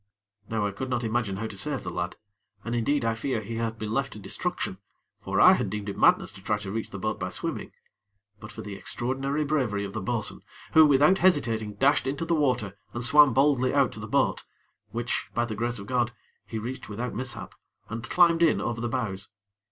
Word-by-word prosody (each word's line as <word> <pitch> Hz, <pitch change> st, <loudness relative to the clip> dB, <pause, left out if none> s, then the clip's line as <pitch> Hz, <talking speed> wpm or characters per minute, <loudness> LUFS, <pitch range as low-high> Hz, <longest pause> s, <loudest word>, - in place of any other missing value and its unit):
Now 110 Hz, -2 st, 0 dB
I 100 Hz, -, 0 dB
could 130 Hz, +7 st, -5 dB
not 120 Hz, -1 st, -1 dB
imagine 110 Hz, -3 st, -1 dB
how 110 Hz, -, -3 dB
to 110 Hz, -, -6 dB
save 135 Hz, +8 st, -1 dB
the 90 Hz, -, -5 dB
lad, 90 Hz, +1 st, -3 dB, 0.5 s
and 120 Hz, -, -3 dB
indeed 120 Hz, +2 st, +1 dB
I 115 Hz, -, +2 dB
fear 115 Hz, +2 st, -2 dB
he 110 Hz, +2 st, -5 dB
had 115 Hz, -1 st, -2 dB
been 110 Hz, -1 st, -4 dB
left 135 Hz, +2 st, -1 dB
to -, -, -9 dB
destruction 95 Hz, -1 st, -3 dB, 0.4 s
for -, -, -1 dB
I -, -, +9 dB
had -, -, 0 dB
deemed 105 Hz, 0 st, -4 dB
it 100 Hz, -, -4 dB
madness -, -, +4 dB
to 95 Hz, -, -13 dB
try 105 Hz, +2 st, 0 dB
to 100 Hz, -2 st, -6 dB
reach 110 Hz, +1 st, -3 dB
the 100 Hz, -, -7 dB
boat 110 Hz, +3 st, -2 dB
by 90 Hz, -, -2 dB
swimming 90 Hz, -, -4 dB, 0.7 s
but 105 Hz, -, -10 dB
for -, -, -8 dB
the 105 Hz, -, -6 dB
extraordinary 135 Hz, +8 st, -2 dB
bravery 125 Hz, -9 st, 0 dB
of 100 Hz, -, -7 dB
the 110 Hz, -, -3 dB
bo'sun, 110 Hz, +2 st, -2 dB, 0.3 s
who, 160 Hz, -1 st, +8 dB
without 150 Hz, +7 st, +5 dB
hesitating, 115 Hz, -, +2 dB
dashed 135 Hz, 0 st, +3 dB
into 140 Hz, +5 st, -2 dB
the 170 Hz, -, +1 dB
water 125 Hz, -, 0 dB, 0.2 s
and 120 Hz, -, -2 dB
swam 145 Hz, +2 st, +7 dB
boldly 135 Hz, +1 st, +3 dB
out 140 Hz, -3 st, +4 dB
to -, -, -9 dB
the -, -, -6 dB
boat, -, -, +1 dB, 0.5 s
which, 120 Hz, +1 st, -2 dB
by 120 Hz, +1 st, +2 dB
the 115 Hz, -, -4 dB
grace 120 Hz, +3 st, -2 dB
of 100 Hz, -, -6 dB
God, 120 Hz, +1 st, 0 dB, 0.4 s
he 110 Hz, -, -4 dB
reached 120 Hz, +3 st, -5 dB
without 120 Hz, +4 st, -4 dB
mishap, 130 Hz, 0 st, -5 dB, 0.3 s
and 115 Hz, +1 st, -5 dB
climbed 170 Hz, +4 st, +4 dB
in 165 Hz, -2 st, +4 dB
over 115 Hz, -1 st, -2 dB
the 120 Hz, -, -1 dB
bows. 100 Hz, -6 st, -3 dB
120 Hz, 220 wpm, -27 LUFS, 105-135 Hz, 0.7 s, I